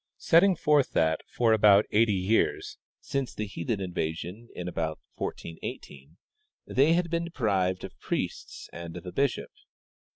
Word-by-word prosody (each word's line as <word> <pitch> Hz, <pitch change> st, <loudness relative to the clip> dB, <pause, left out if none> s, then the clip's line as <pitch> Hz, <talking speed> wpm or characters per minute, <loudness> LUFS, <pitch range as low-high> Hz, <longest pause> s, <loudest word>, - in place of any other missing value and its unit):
setting 180 Hz, +3 st, +5 dB
forth 150 Hz, -3 st, +2 dB
that 80 Hz, 0 st, +2 dB
for 115 Hz, -2 st, +2 dB
ahout 105 Hz, -1 st, +6 dB
eighty 110 Hz, -1 st, +3 dB
years 95 Hz, +5 st, 0 dB, 0.2 s
(since' 135 Hz, -3 st, -3 dB
the 110 Hz, -, -3 dB
heathen 100 Hz, +1 st, -3 dB
in 95 Hz, -2 st, -5 dB
vasion, 85 Hz, +9 st, -4 dB
in 90 Hz, -, -5 dB
about 80 Hz, -3 st, -3 dB
1418) 80 Hz, -2 st, -7 dB, 0.5 s
they 145 Hz, +5 st, +3 dB
had 170 Hz, -1 st, 0 dB
been 170 Hz, 0 st, 0 dB
deprived 95 Hz, -, 0 dB
of -, -, -9 dB
priests -, -, -4 dB
and 85 Hz, 0 st, -7 dB
of -, -, -10 dB
a 90 Hz, -, -6 dB
bishop. 140 Hz, +3 st, -1 dB
105 Hz, 150 wpm, -28 LUFS, 85-135 Hz, 0.5 s, ahout